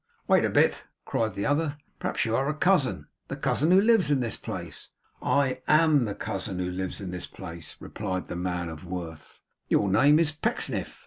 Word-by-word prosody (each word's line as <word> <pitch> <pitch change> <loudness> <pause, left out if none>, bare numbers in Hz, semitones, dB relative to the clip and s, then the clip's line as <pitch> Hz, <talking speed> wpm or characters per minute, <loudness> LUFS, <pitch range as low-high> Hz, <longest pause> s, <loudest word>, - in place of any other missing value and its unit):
'Wait - - +4
a - - +2
bit!' - - +2 0.2
cried 110 -3 -1
the 100 - -2
other, 145 0 0 0.2
'Perhaps - - -1
you 115 0 0
are 135 +3 +1
a 150 - -1
cousin 165 -5 +2 0.2
the - - -4
cousin 155 +4 +1
who 185 +2 +7
lives 215 -6 +4
in 145 -2 +3
this 120 -3 -1
place?' - - -7 0.3
'I 140 -2 +1
AM 155 -5 +4
the 100 -2 -4
cousin 95 -1 -4
who 90 0 -2
lives 95 0 -4
in 95 -3 -6
this 90 -1 -5
place,' 85 -4 -9
replied 95 -4 -4
the - - -6
man 90 -1 -2
of 80 +1 -8
worth. 85 -3 -8 0.3
'Your 100 - +3
name 140 +9 +5
is 160 -1 +3
Pecksniff? 155 - -1
110 Hz, 195 wpm, -27 LUFS, 90-150 Hz, 0.3 s, who